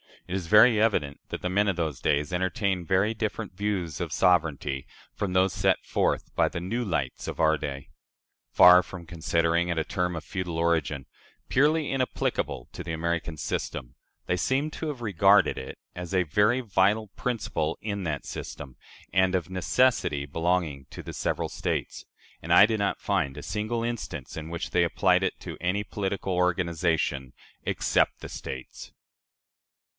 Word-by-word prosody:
It 90 - -3
is 95 -3 -3
very 105 +3 +7
evident 75 -11 +1
that - - -5
the 90 - -1
"men 100 +3 +2
of 100 - +1
those 80 -5 -2
days" 75 0 +1
entertained 95 0 -1
very 100 +5 +2
different 110 -2 -3
views 90 -6 -2
of - - -3
sovereignty 75 -7 +1 0.3
from 100 -3 -3
those 95 +1 +3
set - - +1
forth - - -1
by - - +3
the 85 - -4
"new 115 +7 -2
lights" 70 -9 -2
of - - -5
our 80 0 +4
day. 70 -2 -6 0.6
Far 90 0 +8
from 90 -1 -10
considering 85 +1 +1
it 85 -1 -1
a 80 - +1
term 90 +1 -2
of 80 - -5
feudal 90 -1 -4
origin, 80 -5 0 0.4
"purely 150 +2 +3
inapplicable 130 - -1
to - - -7
the 80 - -4
American 85 0 -2
system," - - -4 0.3
they 90 - 0
seem 135 - 0
to 160 - -5
have 145 -5 -5
regarded 100 -2 +4
it 65 - -7 0.2
as 90 +1 -6
a 90 - +4
very 105 - +2
vital 105 0 +2
principle 95 -9 -2
in 100 -2 -3
that 75 -3 -3
system, 65 -3 -7 0.4
and 95 0 +3
of 90 -1 -1
necessity 95 - +1
belonging 80 -2 -1
to - - -8
the - - -7
several - - -1
States - - -3 0.4
and - - 0
I - - +9
do 110 0 0
not 100 -1 -1
find 65 -1 0
a - - -7
single 110 +2 -2
instance 105 - -5
in 80 0 -6
which 85 0 -4
they - - +3
applied - - +2
it - - -1
to - - -7
any 90 +4 0
political 100 -2 -3
organization, 85 -6 0 0.3
except - - +1
the - - -7
States. 65 -1 -8
90 Hz, 170 wpm, -27 LUFS, 80-105 Hz, 0.6 s, I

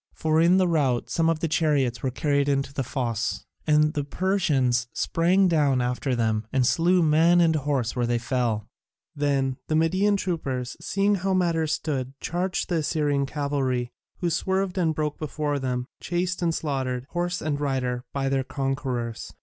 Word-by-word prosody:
For 160 0 +2
in 175 +3 +5
the 185 -1 +3
rout 140 -8 +1
some 165 -1 +2
of 165 -1 0
the 165 - +1
chariots 145 -7 +1
were 130 - 0
carried 140 +3 0
into 140 0 0
the 140 - -2
fosse, 120 -4 -2 0.2
and 150 0 +4
the 145 -3 -1
Persians 140 -8 +1
sprang 185 +3 +2
down 145 -6 +2
after 125 +1 -1
them 110 -2 0
and 130 -2 +2
slew 175 +6 +3
man 165 +3 +4
and 165 -2 +4
horse 140 -5 -1
where 120 -2 0
they 120 0 +1
fell. 115 -3 -1 0.5
Then 135 -2 0
the 155 - 0
Median 185 +6 +2
troopers, 135 -10 -3
seeing 200 +1 +1
how 195 0 0
matters 165 -4 +1
stood, 135 -4 -3
charged 180 +2 -2
the 175 - 0
Assyrian 145 -3 0
cavalry, 135 -4 -1 0.3
who 175 -2 0
swerved 190 +2 0
and 160 -3 +1
broke 150 -1 -2
before 150 -2 -2
them, 125 -2 -2
chased 180 +1 -2
and 165 -2 +1
slaughtered, 130 -4 -2
horse 175 0 -1
and 145 -2 -2
rider, 125 -3 -1
by 135 -1 -1
their 135 0 +1
conquerors. 130 -4 -3
145 Hz, 170 wpm, -25 LUFS, 130-170 Hz, 0.5 s, in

